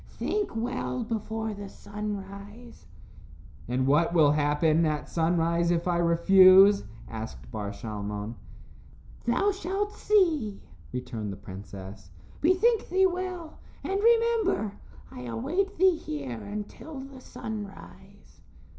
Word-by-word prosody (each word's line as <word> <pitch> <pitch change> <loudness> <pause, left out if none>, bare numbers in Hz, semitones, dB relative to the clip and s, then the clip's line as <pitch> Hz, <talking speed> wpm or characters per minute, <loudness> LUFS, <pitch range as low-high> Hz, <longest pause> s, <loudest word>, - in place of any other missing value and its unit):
Think 410 - -2
well 245 +1 -2
before 220 0 -3
the 200 -1 -8
sunrise." 205 - -8 0.8
"And 125 +2 0
what 155 +5 +3
will 150 -3 +6
happen 150 +2 +2
at 155 -2 -1
sunrise, 170 0 +1
if 170 0 +1
I 175 -1 +2
refuse?" 185 +4 +7 0.2
asked 110 - -8
Bar 105 -1 -4
Shalmon. 105 0 -5 0.9
"Thou 250 +13 +2
shalt 395 +2 -2
see," 330 - +2 0.3
returned 120 -5 -4
the 95 - -7
princess. 95 0 -10 0.3
"Bethink 410 +8 +3
thee 380 +2 +4
well, 360 -3 -3 0.2
and 390 +1 -1
remember, 455 - +3 0.4
I 125 - -8
await 345 - -2
thee 370 -2 +5
here 140 - -5
until 210 +8 -7
the 270 -1 -11
sunrise." 210 -5 -9
200 Hz, 110 wpm, -28 LUFS, -, 0.9 s, refuse